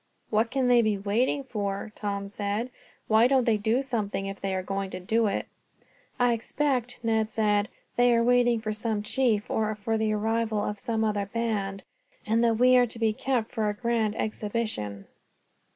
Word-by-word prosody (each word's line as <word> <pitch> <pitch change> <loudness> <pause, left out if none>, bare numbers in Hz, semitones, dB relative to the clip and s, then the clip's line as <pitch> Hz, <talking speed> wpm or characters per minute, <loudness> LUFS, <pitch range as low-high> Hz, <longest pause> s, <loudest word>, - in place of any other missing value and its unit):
"What 220 +2 +2
can 260 0 0
they 245 -1 +6
be 215 -2 +1
waiting 225 +8 0
for?" 205 -4 -4
Tom 200 -2 -3
said. 205 +4 -3 0.4
"Why 220 +2 +5
don't 265 -1 +3
they 225 -2 +3
do 225 +5 +1
something 210 -6 -2
if 195 0 -6
they 195 -1 -1
are 185 - -2
going 195 0 -3
to 185 - -6
do 220 +5 +1
it." 200 - -1 0.7
"I 245 -1 +4
expect," 250 +1 -1
Ned 225 -1 +2
answered, 210 -2 +1
"that - - -16 0.3
they 245 0 +5
are 230 - +3
waiting 240 -1 +3
for 215 -1 -2
some 215 -1 -2
chief, 215 -2 +1
or 215 -1 0
for 220 +2 -2
the 220 -1 +1
arrival 220 0 0
of 210 -1 -3
some 225 0 -1
other 205 -2 0
band, 200 -3 -2 0.4
and 225 +2 +2
that 230 -1 +3
we 255 +2 +5
are 245 -1 +4
to 230 - -7
be 225 -1 +1
kept 245 -1 -1
for 215 -2 0
a 205 - -3
grand 225 -2 0
exhibition." 210 - -3
220 Hz, 190 wpm, -27 LUFS, 205-235 Hz, 0.7 s, they